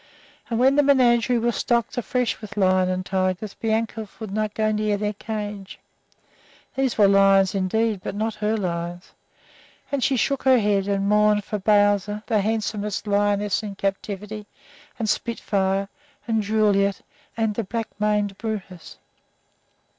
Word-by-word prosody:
And 230 - -1
when 265 +3 +4
the - - +7
menagerie 250 -3 +3
was 235 0 0
stocked 235 -2 0
afresh 245 0 -1
with 215 0 -9
lions 185 -1 +3
and 185 0 -2
tigers 190 +2 -1
Bianca 225 0 -2
would 220 -3 -6
not 215 0 -2
go 215 0 +1
near 210 -1 0
their 210 +1 -2
cages. 205 -2 -6 1.0
These 265 -2 -1
were 205 -2 +6
lions 195 -1 +4
indeed, 205 +2 0
but - - -4
not 220 +2 -1
her 215 +1 -1
lions, 175 -2 -4 0.8
and 280 -3 -1
she 270 - +2
shook 275 +3 0
her 260 -1 +5
head 205 -3 +1
and 200 0 0
mourned 210 0 +3
for 210 +1 -4
"Bowzer," 205 0 +2
the 215 -4 +1
handsomest 210 -1 -2
lioness 205 0 +1
in 205 -2 -6
captivity, 200 +2 -4 0.5
and 225 - -2
"Spitfire," 195 -3 -1 0.4
and 225 -1 +1
"Juliette," 200 -2 +1 0.4
and 225 -2 +1
the 230 - -2
black 225 +3 -4
maned 210 -2 0
"Brutus." 200 -6 -6
210 Hz, 145 wpm, -23 LUFS, 195-225 Hz, 1.0 s, the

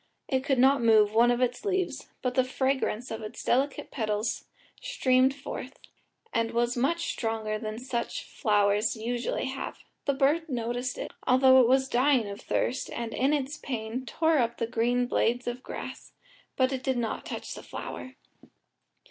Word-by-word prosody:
It 260 -1 0
could 270 -1 +1
not 265 +1 +5
move 215 -2 +5
one 235 +2 +5
of 245 +1 +1
its 250 +4 0
leaves, 380 -3 -1 0.2
but 250 -1 0
the 260 - +3
fragrance 260 -2 -1
of 225 - -4
its 215 0 -7
delicate 270 +3 0
petals 215 -2 -2 0.4
streamed 265 - +2
forth, 270 -1 -7 0.6
and 230 0 +1
was 240 +2 0
much 290 +8 0
stronger 220 -2 -2
than 215 0 -5
such 245 -1 -3
flowers 205 +1 +1
usually 235 +2 -2
have: 265 +1 -5 0.3
the 280 - +1
bird 300 +4 +2
noticed 245 0 -2
it, - - -5 0.2
although 260 0 +7
it 240 - +4
was 265 +1 +3
dying 255 -2 +3
with 200 0 -7
thirst, 255 - -1
and 235 -1 -4
in 265 +3 +2
its 295 0 -1
pain 235 -1 -4
tore 320 +1 +2
up 235 -1 0
the 230 - 0
green 240 +2 +1
blades 245 0 +1
of 245 +1 -4
grass, - - -8 0.4
but 260 0 +1
did 260 -2 0
not 230 -2 -2
touch - - -6
the - - -8
flower. 255 0 -7
250 Hz, 165 wpm, -28 LUFS, 230-265 Hz, 0.6 s, although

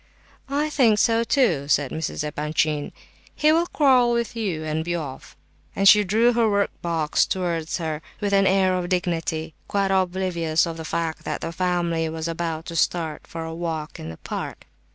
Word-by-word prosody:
"I 295 +2 0
think 235 -8 +4
so 230 +1 +3
too," 210 - +2
said 145 -2 +2
Mrs. 160 -1 -3
Epanchin; 150 0 -1 0.4
"he 305 +1 +4
will 335 +2 +2
quarrel 260 -7 +4
with 235 -1 -1
you, 190 -9 -2
and 155 0 -2
be 175 +1 -2
off," 145 -6 -7 0.4
and 195 - +3
she 210 +1 +8
drew 225 +5 +3
her 230 -2 +3
workbox 170 -6 0
towards 170 -4 -2
her 160 -3 -3 0.2
with 205 -1 -1
an 195 0 +4
air 190 -1 +3
of 180 -1 -2
dignity, 165 -3 -1
quite 200 -1 0
oblivious 180 -4 +1
of 165 -1 -5
the 160 - -6
fact 165 0 -2
that - - -3
the - - -3
family 170 -2 0
was 160 0 -4
about 165 -1 -3
to 170 - -7
start 165 -1 -1
for 165 -1 -6
a 160 0 -5
walk 165 -2 -4
in 80 - -6
the 80 - -8
park. - - -6
170 Hz, 180 wpm, -23 LUFS, 160-200 Hz, 0.4 s, she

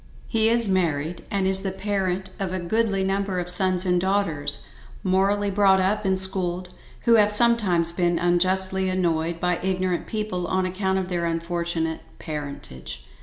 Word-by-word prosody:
He 225 -1 +2
is 235 -1 +4
married, 170 -3 -1
and 195 -1 -1
is 190 0 +4
the 195 - -2
parent 190 -1 -3
of 195 -2 -3
a 185 - -2
goodly 200 +2 0
number 195 -1 -1
of 180 0 -1
sons 185 0 +4
and 180 -1 +1
daughters, 165 -7 0 0.4
morally 200 +2 +1
brought 195 -1 +4
up 195 +3 0
and 190 -1 +1
schooled, 185 -1 0 0.3
who 230 -1 +4
have 210 -1 +4
sometimes, 210 -7 +3
been 175 0 0
unjustly 185 +2 +1
annoyed 170 -2 -1
by 180 -1 0
ignorent 185 -1 -1
people 210 -5 -3
on 185 +1 0
account 190 +1 -1
of 185 -1 -3
their 175 -2 -2
unfortunate 165 -1 -2 0.2
parentage. 65 - -7
185 Hz, 160 wpm, -23 LUFS, 175-195 Hz, 0.4 s, is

